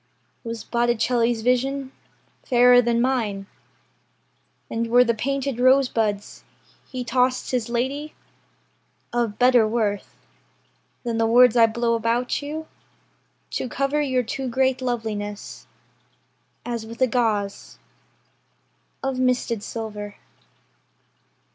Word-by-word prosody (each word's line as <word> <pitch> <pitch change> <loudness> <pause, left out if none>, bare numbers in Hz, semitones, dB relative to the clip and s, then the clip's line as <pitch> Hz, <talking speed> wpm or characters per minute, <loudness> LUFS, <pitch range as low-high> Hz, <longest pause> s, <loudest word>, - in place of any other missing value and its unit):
Was 230 -2 -5
Botticelli's 235 -1 +1
vision 265 +2 0 0.5
Fairer 245 -1 +5
than 235 0 +1
mine; 225 -6 -1 1.2
And 230 +1 -2
were 245 +2 +6
the 235 -1 +1
painted 275 +2 -2
rosebuds 245 -6 +2 0.5
He 255 -2 -4
tossed 250 +1 0
his 245 -3 -1
lady, 270 +6 -2 1.0
Of 235 -4 -1
better 245 -3 +5
worth 215 -3 -2 0.9
Than 230 -2 -2
the 225 - +3
words 245 +1 +6
I 230 -1 +6
blow 230 +1 0
about 230 +3 0
you 305 +2 -5 0.9
To 255 - -3
cover 275 +3 0
your 260 -3 +1
too 260 +3 -4
great 260 +1 +1
loveliness 220 -4 -4 1.0
As 235 -2 -3
with 230 +1 -10
a - - +4
gauze 215 -5 -1 1.3
Of 270 -1 -2
misted 250 -3 0
silver? 210 -2 -6
240 Hz, 105 wpm, -23 LUFS, 225-255 Hz, 1.3 s, were